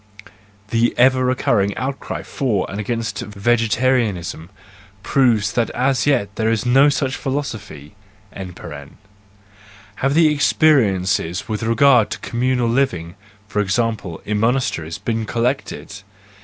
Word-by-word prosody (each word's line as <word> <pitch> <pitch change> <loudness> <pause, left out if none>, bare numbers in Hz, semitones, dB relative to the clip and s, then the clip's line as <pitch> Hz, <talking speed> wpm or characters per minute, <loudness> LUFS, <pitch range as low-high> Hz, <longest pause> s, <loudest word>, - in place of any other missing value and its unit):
(The 115 +1 +2
ever 130 +1 +4
recurring 120 -6 +1
outcry 135 +3 -4
for 110 -9 -1
and 100 - -5
against 110 -1 -3
vegetarianism 110 -4 0 0.5
proves 110 -6 +2
that 120 -1 0
as 130 0 +1
yet 100 -9 +1
there 110 0 +1
is 115 -1 0
no 135 +4 +5
such 135 -2 -1
philosophy!) 110 - -5 0.4
Have 100 - -8
the 160 -2 +5
experiences 100 - +2
with 110 0 -3
regard 115 0 +4
to - - -4
communal 125 0 0
living, 115 -10 0 0.3
for 105 +1 -2
example, 100 -3 -2
in 105 0 -1
monasteries, 115 -9 0
been 115 -1 -3
collected? 115 -4 -3
115 Hz, 115 wpm, -20 LUFS, 100-130 Hz, 0.5 s, no